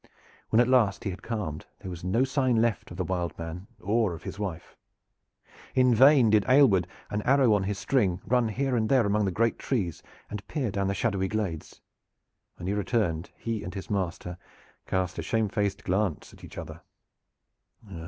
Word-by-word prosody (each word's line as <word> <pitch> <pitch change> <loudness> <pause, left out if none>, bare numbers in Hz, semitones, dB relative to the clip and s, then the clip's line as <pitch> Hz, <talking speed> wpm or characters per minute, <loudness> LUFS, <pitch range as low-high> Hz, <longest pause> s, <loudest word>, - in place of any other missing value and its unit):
When 110 - +4
at 120 - +5
last 115 -7 +3
he 100 - -2
had 90 - -9
calmed 100 -10 -4
there 95 - -6
was 85 -1 -8
no 95 +8 +2
sign 135 -2 +1
left 115 -3 +1
of 85 - -9
the 95 - 0
"Wild 90 -1 -2
Man" 85 +4 -6
or 110 -3 +1
of - - -12
his 100 - -7
wife. 90 -5 -5 1.0
In 125 -1 +5
vain 130 -1 +6
did 105 -2 +5
Aylward, 125 -10 +5 0.2
an 105 - -1
arrow 130 -1 +4
on 100 -2 +1
his 100 0 -2
string, 95 -10 +1
run 125 -1 +2
here 130 +4 -1
and 110 -2 +1
there 130 -4 +4
among 105 +1 +2
the 95 - 0
great 115 +5 +1
trees 95 - -2 0.3
and 105 -1 -7
peer 135 -9 -2
down 100 0 -1
the 100 - -1
shadowy 100 -3 0
glades. 95 -6 -4 0.7
When - - -9
he 95 - 0
returned 105 -5 -1
he 115 -2 -3
and 90 - -7
his 95 +2 -6
master 90 -2 -3 0.5
cast 95 -2 -1
a - - 0
shamefaced 105 -3 -1
glance 95 -2 -1
at - - -17
each - - -11
other. - - -7
105 Hz, 185 wpm, -27 LUFS, 95-115 Hz, 1.0 s, vain